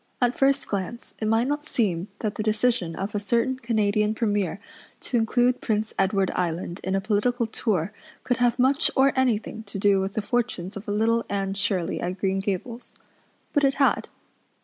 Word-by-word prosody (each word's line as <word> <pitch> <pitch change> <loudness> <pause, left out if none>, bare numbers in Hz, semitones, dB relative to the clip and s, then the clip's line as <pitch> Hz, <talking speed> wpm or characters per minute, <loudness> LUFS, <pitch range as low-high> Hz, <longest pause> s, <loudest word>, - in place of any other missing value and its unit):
At 245 0 +2
first 275 +1 +2
glance 200 +4 -4
it 215 - -1
might 225 +3 +2
not 290 +1 -1
seem 205 - -1
that 215 -2 -1
the - - -4
decision 215 -5 +1
of 195 +2 -4
a 205 - 0
certain 235 +5 0
Canadian 215 -2 +1
Premier 205 -4 0 0.4
to - - -4
include 245 +2 +2
Prince 215 -1 -1
Edward 195 0 +2
Island 175 0 -2
in 190 +1 0
a - - +2
political 225 +4 +1
tour 210 -4 -1 0.3
could 245 - 0
have 245 -1 +2
much 270 +5 +3
or 270 0 +4
anything 230 -4 0
to 200 0 -5
do 195 -1 +3
with 195 +1 -3
the 215 - -1
fortunes 215 -6 -2
of 200 +1 -8
little 225 +3 +2
Anne 195 -1 -1
Shirley 195 -3 0
at 180 +2 -3
Green 195 0 0
Gables. 205 +5 -4 0.6
But 290 - +2
it 275 0 +3
had. 275 - +2
215 Hz, 180 wpm, -25 LUFS, 195-245 Hz, 0.6 s, or